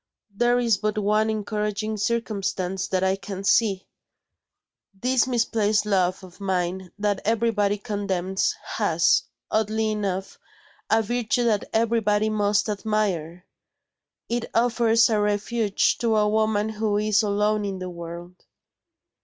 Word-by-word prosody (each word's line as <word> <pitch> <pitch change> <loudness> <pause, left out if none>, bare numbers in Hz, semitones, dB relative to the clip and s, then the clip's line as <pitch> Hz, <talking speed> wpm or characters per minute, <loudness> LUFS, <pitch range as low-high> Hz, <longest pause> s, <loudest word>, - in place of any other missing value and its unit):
There 240 +3 +3
is 235 -4 +2
but 215 +1 -2
one 215 +1 +2
encouraging 210 0 -2
circumstance 200 -4 -2
that 185 -1 0
I 190 0 +2
can 195 -1 -7
see. 200 -2 +2 1.1
This 255 +1 +2
misplaced 220 -4 +1
love 190 -2 +1
of 185 +1 -14
mine 185 -1 -2
that 205 -1 -1
everybody 215 -2 +1
condemns 195 -3 -1
has, - - +2 0.3
oddly 220 0 0
enough, 195 -3 -3 0.5
a 225 0 +3
virtue 240 +1 0
that 220 -4 +1
everybody 220 -2 +1
must 210 0 +1
admire. 195 -5 -2 0.8
It 235 0 -2
offers 230 -1 +4
a 220 -2 +1
refuge 205 +1 +1
to 230 -2 +1
a 210 -1 +3
woman 215 0 +1
who 215 -1 -1
is 210 0 +2
alone 210 0 +1
in 195 -1 -3
the 185 -1 -6
world." 170 +1 -9
210 Hz, 125 wpm, -24 LUFS, 195-220 Hz, 1.1 s, offers